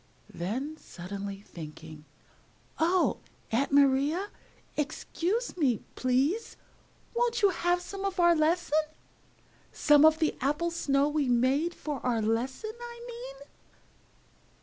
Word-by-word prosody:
Then, 255 - -3
suddenly 195 - -7
thinking, 155 -4 -10 0.7
"Oh, 345 +3 +2 0.3
Aunt 255 +6 +1
Maria, 285 +7 +3 0.5
excuse 345 - -2
me, 270 - +1
please! 270 - 0 0.6
Won't 475 -1 0
you 400 - +7
have 355 -1 +1
some 395 +2 -6
of 390 -2 -2
our 345 0 +6
lesson? 315 -1 +2 0.9
Some 295 -1 +5
of 315 0 +7
the 315 -1 +1
Apple 300 +6 0
Snow 280 -4 +2
we 295 -3 0
made 265 +8 +2
for 290 -5 -5
our 245 -2 +1
lesson, 235 - -1
I 475 0 -8
mean?" - - -9
300 Hz, 115 wpm, -29 LUFS, 250-355 Hz, 0.9 s, you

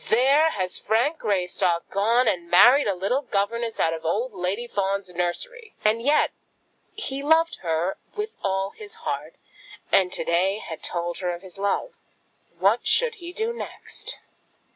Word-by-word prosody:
there 275 +7 +5
has 185 - -3
Frank 240 +9 +1
Greystock 180 -3 0
gone 230 +5 +3
and 175 -5 0
married 245 +11 +7
a 200 - +1
little 200 +9 0
governess 230 -1 -1
out 165 - +2
of 165 0 -6
old 215 +9 -1
Lady 190 +5 -2
Fawn's 200 -3 -2
nursery!" 415 - -4
And 220 +2 +3
yet 290 +5 +3 0.6
he 275 -10 -3
loved 320 +3 +3
her 170 +2 -1 0.2
with 425 +1 -3
all 195 0 -1
his 425 +1 -11
heart, - - -3 0.6
and 185 -2 +4
to - - -1
day 180 +4 +2
he - - -6
had 160 - -7
told 175 0 -3
her 180 -2 -2
of 175 - -13
his 190 0 -12
love. 200 - 0 0.7
What - - +2
should 485 -1 +3
he 345 0 -6
do 445 +5 -2
next? 470 - -7
200 Hz, 165 wpm, -25 LUFS, 180-280 Hz, 0.7 s, married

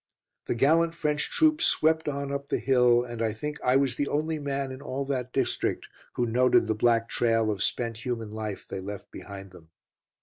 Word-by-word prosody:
The - - 0
gallant 165 +6 +3
French 150 -3 -1
troops 315 0 +3
swept 160 0 +3
on 140 -1 -3
up 140 0 -4
the - - +1
hill, 125 -2 +4
and 120 -2 -6
I 110 -2 0
think 150 +7 -5
I 125 +1 +3
was 135 -2 +2
the 145 - 0
only 155 +1 -1
man 140 -2 -3
in 130 +1 -8
all 140 0 -4
that 130 -2 -3
district - - -1 0.2
who 120 - 0
noted 125 +1 +3
the 110 - 0
black 115 +1 +2
trail 115 -2 +1
of 100 -3 -4
spent 115 +1 -2
human 115 -4 -3
life 110 -2 -5
they - - -5
left 100 0 -8
behind 100 -1 -9
them. 85 -3 -16
125 Hz, 200 wpm, -27 LUFS, 115-140 Hz, 0.2 s, hill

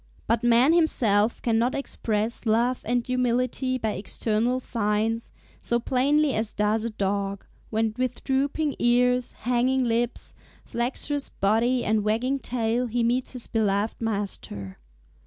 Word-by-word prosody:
But 230 0 +1
man 240 +6 +5
himself 230 -10 +2
cannot 235 +2 +1
express 225 -4 -2
love 235 +3 +2
and 240 +1 0
humility 255 +1 0
by 220 -3 -1
external 220 +4 -1
signs, 225 -1 -1 0.3
so 235 - 0
plainly 275 +4 +2
as 220 0 -2
does 210 +1 +1
a 230 - -1
dog, 200 -1 -2 0.2
when 220 0 0
with 255 -1 -2
drooping 280 +2 0
ears, 250 +1 +2
hanging 250 +2 +1
lips, 235 0 -1 0.3
flexuous 270 +4 -2
body, 230 +5 +1
and 215 0 +1
wagging 240 +6 0
tail, 240 0 -1
he 235 +1 0
meets 245 +3 0
his 250 -2 -5
beloved 210 0 0
master. 195 - -4
235 Hz, 130 wpm, -25 LUFS, 220-255 Hz, 0.3 s, man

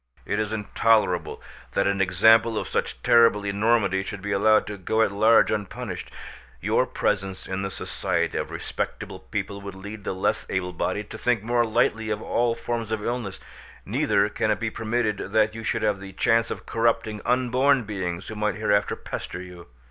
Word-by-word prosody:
"It 105 - -1
is 110 0 -1
intolerable 105 -3 +1 0.3
that 100 - +2
an 100 0 +1
example 110 +5 +4
of - - -2
such - - -3
terrible 115 -3 +5
enormity 100 -1 +2
should 95 0 -7
be 100 - -3
allowed 110 +2 +4
to 105 - -6
go 110 +4 +2
at 100 - +1
large 110 +3 +5
unpunished. 105 -1 -4 0.5
Your - - +1
presence 95 -1 -2
in 95 0 -3
the 95 - -2
society - - -2
of - - -2
respectable - - -5
people 100 0 -5
would 100 -1 -8
lead 100 +2 -8
the 95 - -3
less 95 +2 -1
able 90 -1 -2
bodied 105 +4 -3
to 110 - -7
think 120 -4 +1
more 120 +1 +2
lightly 110 0 +1
of 105 -1 -1
all 115 +1 0
forms 115 -1 -4
of 110 -2 -2
illness; 120 -5 -3 0.5
neither 100 -1 +2
can 110 +1 -1
it - - +1
be 110 -1 -2
permitted 110 -2 -1
that 110 -1 +3
you 115 0 -7
should 110 - -1
have 105 -2 +1
the 95 0 -9
chance 115 +4 +2
of - - -6
corrupting 115 -2 0
unborn 125 +2 +2
beings 95 -4 -4
who 110 - -6
might 105 0 0
hereafter 105 -1 +1
pester - - -6
you. 90 -1 -10
105 Hz, 185 wpm, -25 LUFS, 100-115 Hz, 0.5 s, terrible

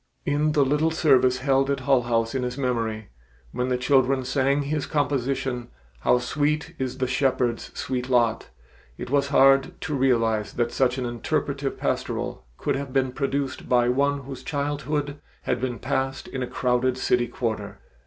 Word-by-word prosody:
In 150 +1 +1
the 145 -2 +4
little 150 +4 +2
service 135 -6 +3
held 135 0 +2
at 140 -1 0
Hull 135 -1 +3
House 115 -1 0
in 135 - -1
his 125 +1 -3
memory, 115 -5 -2 0.4
when 125 +1 -2
the 125 - +1
children 130 0 +2
sang 135 +2 +1
his 145 0 -2
composition, 135 -3 -1 0.3
"How 125 - +3
Sweet 150 +6 -1
is 130 -1 -3
the 130 - 0
Shepherd's 125 -2 0
Sweet 125 -1 -3
Lot," 120 -3 +2 0.5
it - - -7
was 140 -1 +2
hard 135 +4 +4
to 160 - -3
realize 115 -5 +1
that 120 -1 0
such 125 +1 +1
an 130 - -2
interpretive 140 +3 -2
pastoral - - -2
could 145 - -1
have 135 -1 -4
been 130 -1 +1
produced 135 0 -3
by 120 -1 +4
one 140 +2 +1
whose 135 -1 -8
childhood 145 0 -2 0.2
had 125 - -1
been 125 -2 -2
passed 135 +4 -2
in 130 - -5
a 125 - -2
crowded 125 0 0
city 125 -1 +1
quarter. 110 -4 -4
130 Hz, 165 wpm, -25 LUFS, 125-140 Hz, 0.5 s, the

